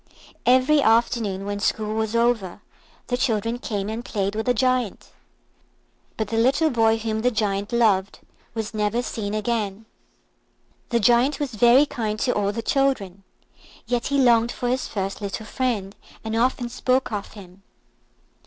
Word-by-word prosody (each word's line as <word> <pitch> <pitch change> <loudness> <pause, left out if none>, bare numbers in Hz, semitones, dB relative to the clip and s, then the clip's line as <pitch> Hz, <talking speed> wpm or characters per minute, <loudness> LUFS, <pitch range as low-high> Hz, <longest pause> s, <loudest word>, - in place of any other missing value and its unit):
Every 260 +4 +5
afternoon, 225 -4 +1
when 205 0 -3
school 215 +1 -1
was 220 0 -2
over, 230 -5 0 0.4
the 245 - -1
children 230 -2 -1
came 205 -4 -3
and 220 +2 -4
played 200 -4 -2
with 220 +2 -3
the 250 - +4
Giant. 255 -2 0 1.1
But 215 -2 -2
the 225 - -2
little 275 +7 +3
boy 225 -2 +3
whom 220 -1 -2
the 250 - +3
Giant 205 -3 -2
loved 205 -5 +2 0.4
was 220 -1 -4
never 215 +3 0
seen 210 -4 -4
again. 215 -1 -2 1.0
The 235 - +2
Giant 245 +6 +3
was 285 -4 -3
very 240 +6 +5
kind 215 -6 -3
to 250 - +1
all 205 -1 0
the 230 +2 -5
children, 220 -9 0 0.6
yet 240 0 -1
he 280 - 0
longed 235 -3 +4
for 245 - -3
his 255 +1 -1
first 195 0 -4
little 200 +2 -5
friend, 215 -5 -2 0.3
and 220 0 -3
often 245 +1 +1
spoke 255 +1 0
of 205 -2 -5
him. 190 -2 -13
225 Hz, 155 wpm, -23 LUFS, 205-245 Hz, 1.1 s, Every